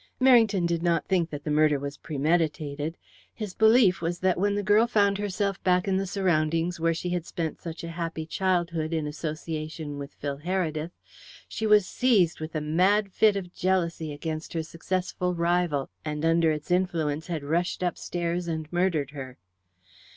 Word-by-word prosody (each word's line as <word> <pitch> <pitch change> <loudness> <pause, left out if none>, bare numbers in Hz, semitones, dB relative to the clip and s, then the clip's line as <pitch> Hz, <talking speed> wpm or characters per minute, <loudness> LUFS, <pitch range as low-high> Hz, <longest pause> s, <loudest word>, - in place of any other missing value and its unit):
Merrington 225 -8 +5
did 170 -1 0
not 170 -1 +1
think 175 -3 +1
that 145 -2 -7
the 150 - -2
murder 150 -1 +4
was 140 +1 -6
premeditated. 150 0 -1 0.4
His 210 -4 -5
belief 220 -4 +5
was 170 +1 -1
that 185 -1 +2
when 205 +1 +1
the 205 - -1
girl 210 +3 +4
found 200 -3 +2
herself 200 -1 -2
back 180 +1 +2
in 190 -1 +2
the 195 0 -1
surroundings 170 -2 0
where 165 +1 +2
she 175 +2 -3
had 175 -2 -1
spent 165 -1 -4
such 165 -1 -7
a 170 - -5
happy 165 -1 -4
girlhood 170 -3 -1
in 160 -2 -1
association 155 -1 -5
with 140 0 -8
Phil 140 -1 -4
Heredith, 165 -2 -2 0.6
she 220 - -3
was 210 -2 +6
seized 200 -8 +2
with 155 +1 -6
a 155 - 0
mad 185 +6 +2
fit 215 -2 +4
of 180 -3 -5
jealousy 170 -4 0
against 155 +2 -5
her 165 -1 -1
successful 180 +2 -2
rival, 170 -4 0
and 150 0 -3
under 165 0 +4
its 155 +3 -3
influence 165 -4 0
had 165 -5 -3
rushed 170 +5 -1
upstairs 175 0 -2
and 160 -1 -4
murdered 170 -6 +1
her. 130 -3 -8
170 Hz, 175 wpm, -27 LUFS, 155-185 Hz, 0.6 s, was